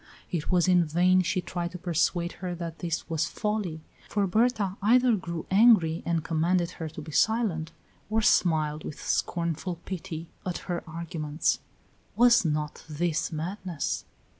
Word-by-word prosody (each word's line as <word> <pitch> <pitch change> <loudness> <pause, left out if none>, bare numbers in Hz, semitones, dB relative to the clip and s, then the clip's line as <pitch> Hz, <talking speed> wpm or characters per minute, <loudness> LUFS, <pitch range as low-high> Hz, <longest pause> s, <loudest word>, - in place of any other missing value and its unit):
It 165 -4 -2
was 180 -1 +3
in 180 -1 +5
vain 180 +4 +3
she 185 +1 0
tried 175 -1 -3
to - - -5
persuade 175 0 0
her 180 -2 -3
that 170 -1 -6
this 170 -2 -3
was 160 -1 0
folly, 210 -7 -2 0.3
for 205 -1 +1
Berta 215 -1 +1
either 245 +3 +5
grew 170 -4 -5
angry 190 -6 +5
and 165 -2 +1
commanded 170 +2 +1
her 160 - -3
to 155 0 -8
be 155 - -9
silent, 190 -5 +1 0.4
or 220 +1 +2
smiled 155 -6 +2
with 150 - -7
scornful 170 +1 -1
pity 165 -3 -5 0.2
at 180 -2 -3
her 175 -2 -3
arguments. 160 -2 -1 0.6
Was 240 -2 +6
not 150 -2 -2
this 160 +2 -1
madness? 170 0 -3
175 Hz, 150 wpm, -27 LUFS, 160-190 Hz, 0.6 s, Was